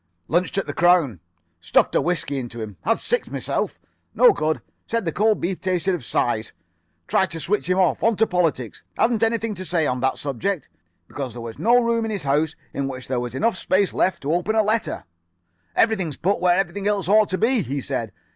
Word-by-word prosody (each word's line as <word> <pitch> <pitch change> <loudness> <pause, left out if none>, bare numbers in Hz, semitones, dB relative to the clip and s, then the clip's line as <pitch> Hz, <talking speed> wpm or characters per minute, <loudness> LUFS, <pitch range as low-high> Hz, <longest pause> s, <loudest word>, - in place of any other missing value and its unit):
"Lunched 175 +4 0
at 195 - +1
the - - -5
'Crown.' 170 - +3 0.4
Stuffed 85 - +2
a - - +3
whiskey 145 -3 -1
into 120 -2 -7
him. 110 -3 -6
Had 225 +4 +1
six 485 - -1
myself. - - -2 0.4
No 485 -3 +7
good. 155 - -1 0.3
Said 230 -3 -1
the 165 - 0
cold 215 +5 +2
beef 180 +1 -2
tasted 185 -1 0
of 175 - -3
size. 115 -1 -1 0.5
Tried 190 - +2
to 165 - -5
switch 200 +4 -1
him 185 - +2
off; 185 -3 +2
on 230 0 +3
to 225 - +3
politics. 165 - -1 0.2
Hadn't 225 -1 +2
anything 225 -1 +1
to 185 - -6
say 170 -3 +1
on 125 -2 0
that 130 +1 0
subject, 150 +6 -2 0.4
because 135 -5 -5
there 120 - -7
was 115 -1 -8
no 240 +3 +5
room 230 0 +1
in 225 - -2
his 205 -4 -3
house 150 +3 +1 0.2
in 140 0 -2
which 130 -1 -6
there 130 -2 0
was 120 0 -5
enough 225 - +1
space 190 +1 +1
left 185 -4 0
to 145 +3 0
open 180 +6 0
a 220 -1 +3
paper. 220 +2 0 0.7
"'Everything's 190 -10 +1
put 195 +5 0
where 180 0 +3
everything 195 +1 -1
else 205 -3 0
ought 210 +1 +4
to 185 - -1
be,' 235 +2 +2
he 140 -3 -3
said. 125 -5 -3
180 Hz, 210 wpm, -23 LUFS, 140-210 Hz, 0.7 s, No